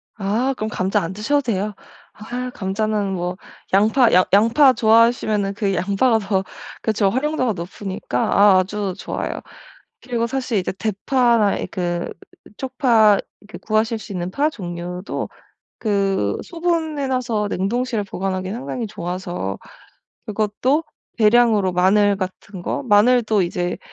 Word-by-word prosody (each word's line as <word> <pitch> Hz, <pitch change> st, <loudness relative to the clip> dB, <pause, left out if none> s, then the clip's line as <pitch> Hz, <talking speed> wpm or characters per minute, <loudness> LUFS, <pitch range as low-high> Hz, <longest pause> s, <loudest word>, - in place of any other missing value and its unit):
아. 220 Hz, +6 st, 0 dB
그럼 215 Hz, -, -3 dB
감자 195 Hz, -1 st, 0 dB
안 165 Hz, +3 st, -4 dB
드셔도 285 Hz, +8 st, +1 dB
돼요. 210 Hz, -4 st, -2 dB, 0.4 s
아. 245 Hz, +4 st, -5 dB
감자는 205 Hz, 0 st, -1 dB
뭐 180 Hz, 0 st, -3 dB, 0.4 s
양파 220 Hz, +5 st, +4 dB
양 185 Hz, +1 st, +5 dB
양파 235 Hz, +6 st, +6 dB
좋아하시면은 220 Hz, -3 st, +3 dB
그 200 Hz, -2 st, -1 dB
양파가 200 Hz, +6 st, +2 dB
더 195 Hz, -2 st, -1 dB, 0.4 s
그쵸. 215 Hz, -3 st, +1 dB
활용도가 260 Hz, -1 st, 0 dB
높으니까 180 Hz, -6 st, -5 dB
아 200 Hz, +3 st, +5 dB
아주 195 Hz, 0 st, -2 dB
좋아요. -, -, -4 dB, 0.6 s
그리고 235 Hz, -2 st, -2 dB
사실 255 Hz, -3 st, -2 dB
이제 185 Hz, -, -2 dB
대파나 225 Hz, +1 st, +1 dB
이 -, -, -3 dB
그 175 Hz, -1 st, -3 dB, 0.5 s
쪽파 235 Hz, -6 st, +3 dB, 0.3 s
그 -, -, -8 dB
구하실 220 Hz, +1 st, 0 dB
수 210 Hz, -, -10 dB
있는 180 Hz, -1 st, -3 dB
파 295 Hz, +7 st, +1 dB
종류도 180 Hz, -, -5 dB, 0.5 s
그 195 Hz, -, 0 dB
소분해 325 Hz, -5 st, -1 dB
놔서 240 Hz, -5 st, -1 dB
냉동실에 230 Hz, +3 st, -1 dB
보관하기 190 Hz, -1 st, -3 dB
상당히 240 Hz, 0 st, -4 dB
좋아서 175 Hz, -, -4 dB, 0.7 s
그것도 215 Hz, +8 st, 0 dB, 0.4 s
대량으로 215 Hz, -3 st, +4 dB
마늘 200 Hz, +3 st, +3 dB
같은 190 Hz, 0 st, -6 dB
거? -, -, -2 dB
마늘도 220 Hz, -1 st, +4 dB
이제 175 Hz, 0 st, -2 dB
210 Hz, 275 characters per minute, -21 LUFS, 190-240 Hz, 0.7 s, 양파